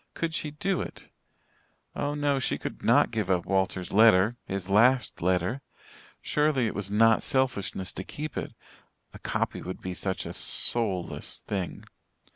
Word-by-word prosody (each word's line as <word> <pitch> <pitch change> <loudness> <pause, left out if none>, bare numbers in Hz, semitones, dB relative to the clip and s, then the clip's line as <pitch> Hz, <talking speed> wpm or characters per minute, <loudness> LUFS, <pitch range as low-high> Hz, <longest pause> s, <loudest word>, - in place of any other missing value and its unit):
Could 165 -1 -2
she 155 - -2
do 180 +6 -2
it? - - -9 0.9
Oh, 145 +1 -2
no, 145 -2 +1
she 130 - -1
could - - -7
not - - +4
give 110 -5 -2
up 90 -2 +1
Walter's 95 -1 -1
letter 110 +1 +5
his 95 -1 -4
last 125 +6 +3
letter. 90 +8 0 0.6
Surely 150 -4 +1
it 110 - -2
was 100 -1 -3
not 115 +2 +4
selfishness 115 -8 -1
to 95 - -5
keep 150 +7 -6
it. - - -5 0.6
A - - -11
copy - - -2
would 90 - -6
be 90 - -5
such 95 +1 -3
a - - -6
soulless 100 -7 +1
thing. 95 -4 -4
110 Hz, 155 wpm, -27 LUFS, 95-135 Hz, 0.9 s, letter